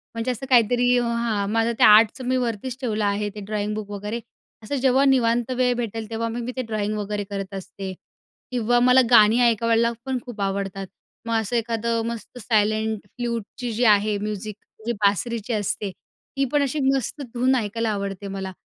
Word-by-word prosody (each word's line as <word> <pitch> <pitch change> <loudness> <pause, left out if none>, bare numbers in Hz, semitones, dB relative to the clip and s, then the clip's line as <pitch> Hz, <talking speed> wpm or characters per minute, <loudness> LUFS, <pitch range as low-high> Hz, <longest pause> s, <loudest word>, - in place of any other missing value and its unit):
म्हणजे 230 +2 -1
असं 250 +2 -5
काहीतरी 245 +1 +4
हां, 235 -4 -1
माझं 225 +1 +2
ते - - +5
आर्टचं 220 +4 +6
मी 255 0 +2
वरतीच 240 0 -3
ठेवलं 215 -4 -1
आहे 205 +1 0
ते - - -6
ड्रॉइंग 210 0 -2
बुक 215 -1 -5
वगैरे 210 +3 -4 0.4
असं 285 - -3
जेव्हा 265 +1 +4
निवांत 240 -3 +2
वेळ 250 -1 +3
भेटेल 225 -2 -4
तेव्हा 230 0 -2
मग 235 +2 -4
मी 245 - -4
ते - - +1
ड्रॉईंग 215 -3 -2
वगैरे 210 0 -3
करत 195 -1 -5
असते. 190 0 -6 0.6
किंवा 245 -1 +2
मला 250 +1 +6
गाणी 220 0 +7
ऐकायला 230 0 +2
पण 265 -1 -1
खूप 235 -5 -7
आवडतात. 195 0 -2 0.4
मग 230 - -1
असं 220 +3 -3
एखादं 230 0 0
मस्त 235 +1 -6
सायलेंट 220 -1 +1
फ्लूटची 235 +1 -4
जी 235 +3 0
आहे 210 0 +4
म्युझिक, 210 0 -4 0.3
जी 235 - 0
बासरीची 220 +4 +1
असते, 205 -1 -2 0.5
ती 275 - +2
पण 295 - +3
अशी 280 +3 -1 0.2
मस्त 270 +3 -3
धून 255 +2 +2
ऐकायला 230 -1 -1
आवडते 200 -1 -4
मला. 195 -1 -5
225 Hz, 175 wpm, -23 LUFS, 205-240 Hz, 0.6 s, गाणी